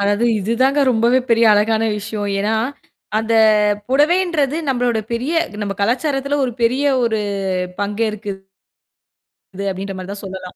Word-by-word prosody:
அதாவது, 205 +3 +1 0.2
இதுதாங்க 255 +8 +1
ரொம்பவே 240 +2 +3
பெரிய 230 0 +4
அழகான 220 +2 +2
விஷயம். 210 0 -4
ஏன்னா, 210 +2 0 0.6
அந்தப் 215 -2 +3
புடவைன்றது 305 0 +2
நம்மளோட 245 -3 +1
பெரிய 250 +7 -2 0.3
நம்ம 200 -1 -3
கலாச்சாரத்துல 270 +5 0
ஒரு 250 - -2
பெரிய 255 +5 +2 0.2
ஒரு 220 -2 0 0.6
பங்கேற்க்குது 205 -2 -3 1.2
அப்பிடின்ற 195 +1 -5
மாரிதான் 195 +2 -7
சொல்லலாம். 185 -1 -8
225 Hz, 115 wpm, -19 LUFS, 205-255 Hz, 1.2 s, பெரிய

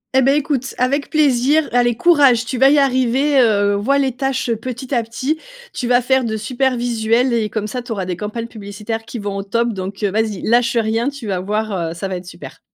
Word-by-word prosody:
Eh 265 - +5
beh, 270 +2 +3
écoute, 275 -3 -2
avec 275 +3 0
plaisir, 290 0 +2
allez 240 -1 +2
courage, 275 -6 +4
tu 250 +1 -4
vas 270 +1 +6
y 295 - +4
arriver, 270 +1 +2
heu, 205 -3 +3
vois 215 +8 +1
les 270 -2 +1
tâches, 260 0 -2
heu, 230 - +1
petit 250 +3 -6
à 240 - +2
petit, 255 +7 -3 0.3
tu 245 - -3
vas 245 0 +4
faire 265 +1 +2
de 220 -2 -2
super 255 +3 -1
visuels 235 +1 +1
et 220 -2 0
comme 215 -2 -3
ça 250 +4 -4
tu 240 0 -10
auras 195 -4 -2
des 180 -1 -3
campagnes 210 +5 -5
publicitaires 220 0 -6
qui 240 - -7
vont 205 -2 -4
au - - -2
top 230 +4 0
donc 195 +1 -6
vas-y, 210 0 -1
lâche 235 +1 +2
rien, 225 +3 0
tu 280 -4 -9
vas 195 -3 -2
voir, 210 +3 -2 0.2
heu, - - -5
ça 185 +3 -4
va 185 - -3
être 180 0 -11
super! - - -11
235 Hz, 230 wpm, -18 LUFS, 215-265 Hz, 0.3 s, vas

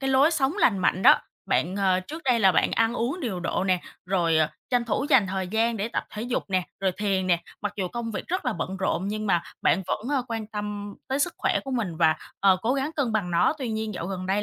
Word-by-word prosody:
cái 270 0 -1
lối 275 +4 +5
sống 280 -4 +1
lành 210 - +4
mạnh 185 0 +1
đó. - - +7 0.3
Bạn, 180 +4 +1
ờ, 190 -2 +2
trước 310 - -8
đây 245 -3 +3
là 190 -2 +6
bạn - - +2
ăn 225 +1 +2
uống 250 +10 -2
điều 215 - -3
độ 180 - -1
nè, 185 -2 +2 0.3
rồi, 170 -4 +2
ờ, 155 -1 +3 0.2
tranh 245 -2 +2
thủ 270 +4 -1
dành 255 -8 +6
thời 190 -1 -3
gian 225 +3 +1
để 210 +2 -2
tập - - -2
thể 215 - -5
dục 245 +1 -2
nè, 185 -1 +2 0.2
rồi 190 -1 +1
thiền 195 -2 0
nè, 175 -2 +2 0.2
mặc 205 - -2
dù 190 -3 -1
công 235 +2 -4
việc 190 - -5
rất 365 0 -1
là 250 - +1
bận 185 +1 -4
rộn, 190 0 -1
nhưng 215 +1 -3
mà 175 -4 +2 0.2
bạn 190 - +3
vẫn, 215 +5 -2
ờ, 275 -3 +1
quan 225 -2 -3
tâm 210 -1 -5
tới 270 +1 0
sức 345 +5 0
khỏe - - +1
của 270 - -5
mình 215 -10 -2
và, 160 -1 +4 0.2
ờ, 190 -1 +5
cố 245 +4 +1
gắng 275 +2 -1
cân 260 -7 0
bằng 195 -5 0
nó. 170 +7 +3
Tuy 260 -4 -3
nhiên, 220 -1 -3
dạo 170 - -4
gần 185 -1 -4
đây 195 +2 +1
210 Hz, 265 wpm, -26 LUFS, 185-245 Hz, 0.3 s, đó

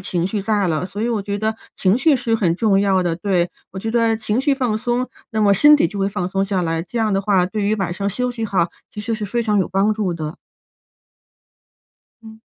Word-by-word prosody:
情 180 -1 -1
绪 200 +1 -2
在 205 -1 +1
了， 160 +2 -1
所 200 +2 -7
以 235 - 0
我 225 -3 0
觉 200 0 -3
得 220 +1 -1 0.2
情 190 +3 +3
绪 300 -1 +4
是 230 -2 -1
很 180 -6 +1
重 200 -3 +3
要 195 -2 +2
的， 175 -2 0
对。 180 -2 0 0.2
我 190 - -6
觉 225 +3 -3
得 230 -1 +2
情 220 0 -1
绪 285 +1 +2
放 250 -5 0
松， 245 +2 -1 0.2
那 220 -1 -1
么 205 -1 +5
身 295 +9 +7
体 285 - +3
就 200 +3 -7
会 195 - +1
放 180 -2 -3
松 195 +1 0
下 195 -2 -1
来， 165 0 -1
这 230 +7 -5
样 220 -1 +1
的 195 - +2
话， 190 -3 +2
对 210 +2 -3
于 210 +2 +2
晚 190 -4 -2
上 200 +2 -2
休 250 +5 -1
息 230 -2 -4
好， 180 -5 +1 0.2
其 210 - -6
实 225 +2 -2
是 215 -1 -4
非 235 +4 -1
常 210 -2 +1
有 190 - +1
帮 195 +3 +1
助 200 -5 -1
的。 155 -1 -5 1.9
嗯。 220 0 -12
205 Hz, 265 characters per minute, -20 LUFS, 185-225 Hz, 1.9 s, 身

